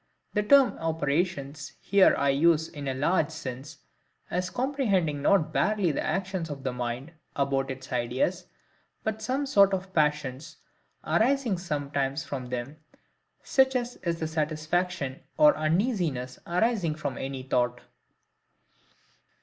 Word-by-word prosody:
The 210 Hz, -, +2 dB
term 255 Hz, 0 st, +5 dB
OPERATIONS 155 Hz, -2 st, -2 dB
here 200 Hz, -1 st, +4 dB
I 140 Hz, -, +2 dB
use 160 Hz, +3 st, +3 dB
in 145 Hz, -3 st, -7 dB
a 135 Hz, -, 0 dB
large 150 Hz, +3 st, +2 dB
sense, 140 Hz, 0 st, -7 dB, 0.5 s
as 180 Hz, 0 st, -1 dB
comprehending 205 Hz, -, 0 dB
not 170 Hz, +1 st, +3 dB
barely 205 Hz, -5 st, +2 dB
the -, -, -2 dB
actions 185 Hz, -1 st, -2 dB
of 140 Hz, -2 st, -6 dB
the 130 Hz, -2 st, -2 dB
mind 125 Hz, +4 st, -4 dB, 0.2 s
about 135 Hz, -1 st, 0 dB
its 130 Hz, -1 st, -7 dB
ideas, 130 Hz, +9 st, -1 dB, 0.6 s
but 220 Hz, 0 st, -2 dB
some 260 Hz, +6 st, -1 dB
sort 200 Hz, -7 st, +5 dB
of 190 Hz, 0 st, -7 dB
passions 150 Hz, -2 st, 0 dB, 0.5 s
arising 240 Hz, -5 st, +2 dB
sometimes 145 Hz, -4 st, -2 dB
from 130 Hz, -3 st, -5 dB
them, 125 Hz, +4 st, -5 dB, 0.7 s
such 265 Hz, -1 st, +3 dB
as 245 Hz, 0 st, -2 dB
is 170 Hz, -2 st, -3 dB
the 160 Hz, -, -1 dB
satisfaction 155 Hz, -2 st, -2 dB, 0.2 s
or 300 Hz, -1 st, +6 dB
uneasiness 155 Hz, -, 0 dB
arising 180 Hz, -3 st, +1 dB
from 145 Hz, -3 st, -4 dB
any 135 Hz, -1 st, -5 dB
thought. 125 Hz, -1 st, 0 dB
160 Hz, 130 wpm, -27 LUFS, 140-195 Hz, 0.7 s, or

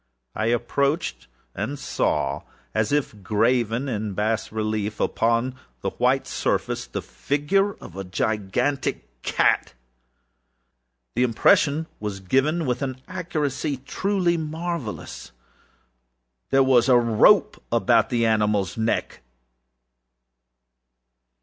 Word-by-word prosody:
I 110 Hz, -, -1 dB
approached 140 Hz, +7 st, 0 dB, 0.3 s
and 125 Hz, +8 st, -3 dB
saw, 70 Hz, -, -1 dB, 0.3 s
as 110 Hz, -1 st, 0 dB
if 140 Hz, -8 st, -1 dB
graven 115 Hz, +5 st, +1 dB
in 105 Hz, -5 st, -3 dB
bas 110 Hz, +2 st, -1 dB
relief 110 Hz, -1 st, -2 dB
upon 115 Hz, +3 st, +1 dB, 0.3 s
the -, -, -2 dB
white -, -, +1 dB
surface, -, -, -1 dB
the -, -, -5 dB
figure 195 Hz, +8 st, 0 dB
of 90 Hz, -, -12 dB
a 95 Hz, -, -4 dB
gigantic 100 Hz, -, -2 dB
cat. -, -, +1 dB, 1.4 s
The 120 Hz, -, +1 dB
impression 145 Hz, -, +3 dB
was 105 Hz, -2 st, -4 dB
given 135 Hz, -, +1 dB
with 125 Hz, 0 st, -1 dB
an 130 Hz, -2 st, -3 dB
accuracy 155 Hz, -5 st, -2 dB
truly 175 Hz, +5 st, 0 dB
marvellous. 160 Hz, -, -5 dB, 1.2 s
There 135 Hz, 0 st, +5 dB
was 130 Hz, -1 st, +4 dB
a 125 Hz, -, +7 dB
rope 115 Hz, -2 st, +4 dB
about -, -, +3 dB
the 120 Hz, -1 st, +1 dB
animalâs 105 Hz, -4 st, +1 dB
neck. 110 Hz, +1 st, -1 dB
120 Hz, 105 wpm, -24 LUFS, 105-145 Hz, 1.4 s, a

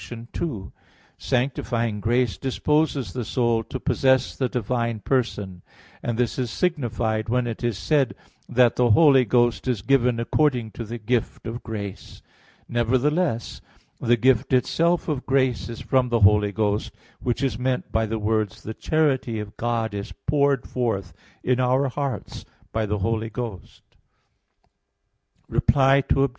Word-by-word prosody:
2: 110 Hz, -, -4 dB, 0.5 s
Sanctifying 120 Hz, -4 st, -1 dB
grace 120 Hz, -1 st, +1 dB
disposes 135 Hz, -, 0 dB
the 125 Hz, -, -3 dB
soul 115 Hz, 0 st, +1 dB
to 130 Hz, -, -6 dB
possess 130 Hz, +1 st, +2 dB
the 130 Hz, -2 st, -1 dB
divine 115 Hz, -1 st, -1 dB
person; 105 Hz, -7 st, -2 dB, 0.4 s
and 120 Hz, -2 st, -2 dB
this 125 Hz, +1 st, 0 dB
is 125 Hz, -2 st, -1 dB
signified 115 Hz, -8 st, -1 dB
when 125 Hz, +1 st, +1 dB
it 115 Hz, 0 st, -5 dB
is 120 Hz, -4 st, 0 dB
said 135 Hz, -, +1 dB, 0.3 s
that 125 Hz, -1 st, +3 dB
the 125 Hz, -1 st, +3 dB
Holy 135 Hz, +2 st, +6 dB
Ghost 120 Hz, +2 st, +1 dB
is 120 Hz, -7 st, -1 dB
given 125 Hz, -1 st, +2 dB
according 120 Hz, -2 st, +1 dB
to 115 Hz, -, -6 dB
the 115 Hz, +3 st, -6 dB
gift 115 Hz, +1 st, -2 dB
of 115 Hz, +2 st, -5 dB
grace. 100 Hz, -4 st, -7 dB, 0.4 s
Nevertheless 120 Hz, -, 0 dB, 0.4 s
the 120 Hz, +1 st, +3 dB
gift 130 Hz, +2 st, +2 dB
itself 165 Hz, +7 st, +2 dB
of 145 Hz, -5 st, -3 dB
grace 130 Hz, -3 st, +1 dB
is 115 Hz, -, -7 dB
from 130 Hz, -2 st, +1 dB
the 120 Hz, -2 st, +1 dB
Holy 105 Hz, 0 st, +5 dB
Ghost; 105 Hz, 0 st, -1 dB, 0.3 s
which 125 Hz, +2 st, -2 dB
is 125 Hz, -5 st, -1 dB
meant 130 Hz, 0 st, -1 dB
by 110 Hz, 0 st, +1 dB
the 110 Hz, +1 st, -2 dB
words, 110 Hz, -1 st, -1 dB
"the 110 Hz, -, -5 dB
charity 135 Hz, -6 st, 0 dB
of 105 Hz, 0 st, -7 dB
God 115 Hz, -2 st, -1 dB
is 100 Hz, -1 st, -5 dB
poured 140 Hz, -2 st, +2 dB
forth 100 Hz, -8 st, -2 dB, 0.3 s
in 125 Hz, 0 st, +1 dB
our 130 Hz, +2 st, +2 dB
hearts 140 Hz, 0 st, -4 dB, 0.3 s
by 110 Hz, -1 st, -1 dB
the 105 Hz, +1 st, -1 dB
Holy 110 Hz, +3 st, -1 dB
Ghost." 110 Hz, -5 st, -7 dB, 1.6 s
Reply 135 Hz, 0 st, +3 dB
Obj. 135 Hz, 0 st, +3 dB
120 Hz, 145 wpm, -24 LUFS, 110-130 Hz, 1.6 s, Holy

